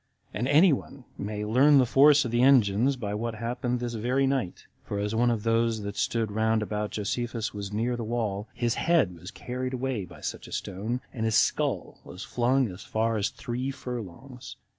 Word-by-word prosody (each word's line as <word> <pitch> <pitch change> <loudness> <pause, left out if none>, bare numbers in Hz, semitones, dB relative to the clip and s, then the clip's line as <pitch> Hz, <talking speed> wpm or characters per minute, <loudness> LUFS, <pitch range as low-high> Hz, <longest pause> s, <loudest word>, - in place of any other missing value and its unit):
And 125 - -1
any 155 +4 +6
one 135 -1 -6
may 105 +1 -4
learn 135 +7 +5
the 130 - +5
force 140 +3 +5
of 120 - -3
the 120 +1 +2
engines 125 -1 +4
by 105 -5 -4
what 115 +2 -3
happened 120 +2 -2
this 120 -1 -3
very 125 +5 +1
night; 135 -9 -2 0.2
for 100 - -4
as 105 +1 -2
one 120 +2 +3
of 115 -3 -1
those 115 -1 +1
that 100 0 -5
stood 115 -3 -1
round 110 +1 +1
about 105 0 -3
Josephus 115 +2 -3
was 100 -1 -6
near 115 +4 -1
the 120 - -4
wall, 110 -3 -2
his 120 -2 0
head 160 - +2
was 90 +3 -9
carried 125 +3 -4
away 125 -6 -2
by 85 -3 -14
such - - -5
a - - -13
stone, 110 +7 -3
and 110 -3 -2
his 110 -1 +1
skull - - +1
was 90 - -9
flung 125 +2 +1
as 90 +1 -9
far 115 +1 0
as 105 -1 0
three 125 +1 -4
furlongs. 125 0 -7
115 Hz, 200 wpm, -27 LUFS, 105-125 Hz, 0.2 s, any